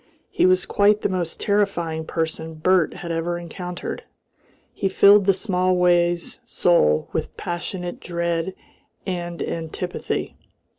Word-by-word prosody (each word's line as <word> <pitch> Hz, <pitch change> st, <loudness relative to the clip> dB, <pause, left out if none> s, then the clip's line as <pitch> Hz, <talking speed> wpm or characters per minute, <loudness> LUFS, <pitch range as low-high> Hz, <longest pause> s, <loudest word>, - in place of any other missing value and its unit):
He -, -, +3 dB
was 185 Hz, 0 st, +3 dB
quite 205 Hz, +1 st, +3 dB
the -, -, +2 dB
most 175 Hz, -3 st, -3 dB
terrifying 175 Hz, -6 st, 0 dB
person 160 Hz, 0 st, -3 dB
Bert 170 Hz, +1 st, +2 dB
had 170 Hz, -, -6 dB
ever 165 Hz, +1 st, -1 dB
encountered. 175 Hz, +1 st, -6 dB, 0.7 s
He 195 Hz, -, -1 dB
filled 200 Hz, +1 st, +6 dB
the -, -, +7 dB
Smallways 180 Hz, -3 st, +1 dB
soul 80 Hz, -, +2 dB
with -, -, -3 dB
passionate 175 Hz, +1 st, -4 dB
dread 170 Hz, +1 st, -2 dB, 0.5 s
and 175 Hz, -2 st, -3 dB
antipathy. 165 Hz, +2 st, -4 dB
175 Hz, 115 wpm, -23 LUFS, 170-185 Hz, 0.7 s, the